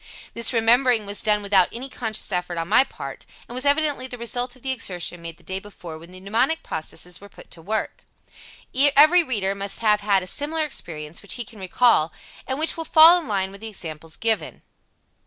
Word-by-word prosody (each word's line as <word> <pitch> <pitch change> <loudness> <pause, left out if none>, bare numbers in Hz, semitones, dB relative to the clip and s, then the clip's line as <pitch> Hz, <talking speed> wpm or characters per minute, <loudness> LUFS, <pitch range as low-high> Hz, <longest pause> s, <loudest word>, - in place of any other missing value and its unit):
This 235 - +3
remembering 235 -1 +3
was 200 +1 -2
done 210 -1 +1
without 195 -3 +4
any 250 +3 -5
conscious 225 -5 -3
effort 180 -1 -2
on 165 0 -3
my 220 +7 +5
part, 270 - -9 0.2
and - - -10
was 255 +2 -2
evidently 285 -3 +1
the 250 - -8
result 245 +1 -3
of 255 - -20
the 265 - 0
exertion 180 -8 -3
made 165 -1 -8
the 175 - -22
day 190 0 -4
before 175 -5 -11
when 165 +2 -13
the 185 0 -12
mnemonic 235 +12 0
processes 175 +3 -7
were 200 - -13
put - - -16
to 165 - -8
work. 215 +6 -3 0.9
Every 310 +5 +6
reader 205 -9 -1
must 200 +2 -2
have 210 -2 +3
had 200 -2 +2
a - - -7
similar 300 - -1
experience 165 - -5
which 200 - -3
he 240 - -5
can 220 -2 -14
recall, 185 -3 +2 0.4
and 265 - -2
which 315 +2 0
will 325 - -4
fall 330 +3 +8
in 320 - -10
line 195 -3 -1
with 200 +1 -13
the 225 - -6
examples 160 -5 -7
given. 225 -1 -2
215 Hz, 210 wpm, -23 LUFS, 185-255 Hz, 0.9 s, fall